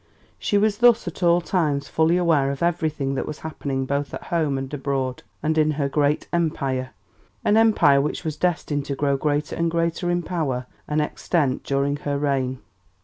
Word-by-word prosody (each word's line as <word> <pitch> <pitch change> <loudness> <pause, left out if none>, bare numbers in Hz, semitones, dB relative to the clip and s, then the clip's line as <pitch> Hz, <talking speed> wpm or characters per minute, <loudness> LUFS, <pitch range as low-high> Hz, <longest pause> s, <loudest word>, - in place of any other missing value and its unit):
She 205 - +1
was 205 0 +2
thus 240 -4 +5
at 175 - -6
all 175 0 +4
times 155 -5 0
fully 160 +2 +2
aware 160 -6 +3
of 140 +3 -3
everything 155 -5 0
that 135 - -2
was 150 - -6
happening 140 -4 -3
both 140 +1 -2
at - - -8
home 155 -5 +1
and 135 +1 -5
abroad, 135 -3 -2 0.2
and 160 +1 +1
in 155 0 +3
her 140 -2 +1
great 145 +1 +1
Empire, 135 -6 -1 0.6
an 210 - +4
Empire 210 -11 +5
which 150 - -3
was 155 -2 -3
destined 155 -4 -1
to 140 - -3
grow 140 0 +1
greater 150 +1 -1
and 170 0 0
greater 170 +1 -1
in 175 0 0
power 145 -8 -2 0.2
and 150 0 +1
extent 150 -3 -1
during 140 +1 0
her 145 -1 -2
reign. 135 -3 -1
150 Hz, 185 wpm, -23 LUFS, 140-170 Hz, 0.6 s, thus